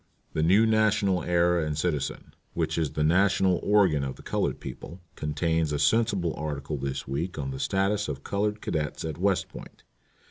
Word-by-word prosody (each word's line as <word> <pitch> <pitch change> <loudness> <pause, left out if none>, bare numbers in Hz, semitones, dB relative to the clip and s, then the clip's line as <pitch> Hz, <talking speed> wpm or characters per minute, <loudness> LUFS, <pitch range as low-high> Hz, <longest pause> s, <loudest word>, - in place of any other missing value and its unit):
"The 80 - 0
New 95 +8 +5
National 110 -4 +2
Era 85 0 +2
and 75 -1 -2
Citizen, 75 -4 -2 0.2
which - - -1
is 80 -3 -1
the 75 - 0
national 95 +2 +3
organ 95 -9 +3
of 65 -1 -4
the - - -15
colored - - -1
people, 85 - -8 0.2
contains 80 +1 0
a 75 - 0
sensible 95 +2 +2
article 75 -1 -4
this 65 0 -4
week 80 +7 -3
on 70 -2 -3
the 65 - -6
status 100 +2 0
of 70 -2 -5
colored 105 +1 -1
cadets 75 -1 -3
at 80 0 -5
West 95 0 +1
Point. - - -12
85 Hz, 175 wpm, -27 LUFS, 75-100 Hz, 0.2 s, New